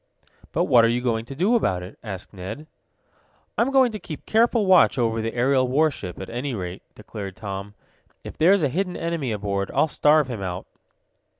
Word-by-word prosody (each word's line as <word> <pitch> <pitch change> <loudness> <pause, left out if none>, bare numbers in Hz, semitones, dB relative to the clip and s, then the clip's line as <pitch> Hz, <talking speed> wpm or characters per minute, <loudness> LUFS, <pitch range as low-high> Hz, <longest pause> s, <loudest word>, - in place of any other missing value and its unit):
"But - - +1
what 120 -2 +5
are - - +5
you 120 +1 +1
going 115 -2 -1
to 135 - -8
do 190 - +2
about 95 - +1
it?" 90 - -11
asked 100 -4 -8
Ned. 100 +10 -7 0.9
"I'm 235 - +2
going 265 -3 +4
to 215 - -6
keep 155 -6 -9
careful 230 -1 +3
watch 185 -6 +5
over 115 -2 0
the 115 +1 -4
aerial 130 +1 +2
warship, 135 - 0
at 95 - -6
any 125 +2 -3
rate," 90 -1 -5
declared 105 -3 -8
Tom. 100 -1 -6 0.5
"If - - -8
there's 185 +2 +4
a 145 - +2
hidden 180 +5 -2
enemy 165 -7 -2
aboard, 100 -2 -2
I'll - - +4
starve 150 -1 +3
him 120 -6 -5
out." 90 -1 -4
125 Hz, 190 wpm, -24 LUFS, 100-160 Hz, 0.9 s, what